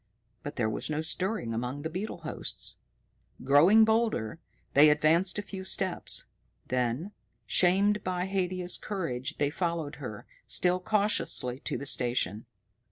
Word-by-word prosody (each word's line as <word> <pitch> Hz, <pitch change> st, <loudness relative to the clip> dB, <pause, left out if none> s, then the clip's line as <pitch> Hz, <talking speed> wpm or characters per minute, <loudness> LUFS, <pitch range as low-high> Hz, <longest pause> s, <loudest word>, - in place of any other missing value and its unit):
But 145 Hz, -, -7 dB
there 115 Hz, -3 st, 0 dB
was 110 Hz, -, -3 dB
no 155 Hz, 0 st, -1 dB
stirring 160 Hz, -, -1 dB
among 125 Hz, +5 st, -4 dB
the 160 Hz, -, -2 dB
beetle 185 Hz, 0 st, -5 dB
hosts. 155 Hz, -, -4 dB, 0.7 s
Growing 165 Hz, +12 st, +6 dB
bolder, 220 Hz, -, 0 dB, 0.3 s
they 150 Hz, +2 st, +7 dB
advanced 160 Hz, +6 st, +3 dB
a 205 Hz, -, -2 dB
few 190 Hz, -1 st, -7 dB
steps; 190 Hz, -1 st, +1 dB, 0.4 s
then, 125 Hz, -, -1 dB, 0.3 s
shamed 200 Hz, +4 st, +3 dB
by 180 Hz, 0 st, -1 dB
Haidia's 185 Hz, -2 st, -1 dB
courage, 160 Hz, -8 st, -4 dB
they 145 Hz, 0 st, +1 dB
followed 165 Hz, -3 st, -3 dB
her, 110 Hz, -7 st, -7 dB, 0.2 s
still 180 Hz, 0 st, +3 dB
cautiously 200 Hz, -, 0 dB
to -, -, -2 dB
the 140 Hz, -, -6 dB
station. 120 Hz, -6 st, -1 dB
165 Hz, 135 wpm, -29 LUFS, 135-190 Hz, 0.7 s, they